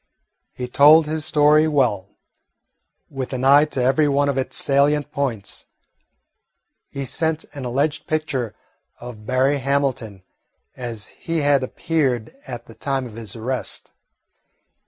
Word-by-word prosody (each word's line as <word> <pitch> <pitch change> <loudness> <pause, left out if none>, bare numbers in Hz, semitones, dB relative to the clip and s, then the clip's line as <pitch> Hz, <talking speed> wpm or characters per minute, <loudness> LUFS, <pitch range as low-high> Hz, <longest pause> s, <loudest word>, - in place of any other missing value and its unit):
He 125 - -6
told 150 +5 +6
his 155 0 -3
story 150 0 +4
well, 125 -11 0 0.9
with 135 -1 -6
an 130 0 -3
eye 140 +2 +7
to 135 -4 -3
every 135 +4 +3
one 145 0 +2
of 140 - -1
its 130 - -3
salient 145 +1 +2
points. 120 -8 -3 1.2
He 140 0 -5
sent 160 +4 -1
an 140 -3 -6
alleged 145 +5 -1
picture 145 -8 -2 0.4
of 115 -3 -10
Berry 130 +2 +2
Hamilton 130 -8 -1 0.5
as 120 -4 -7
he 165 -1 -3
had 145 -1 +3
appeared 130 -4 -1
at 120 -2 -7
the 115 - -14
time 135 +1 -2
of 120 - -10
his 110 -2 -7
arrest. 125 +3 -3
135 Hz, 135 wpm, -21 LUFS, 125-150 Hz, 1.2 s, eye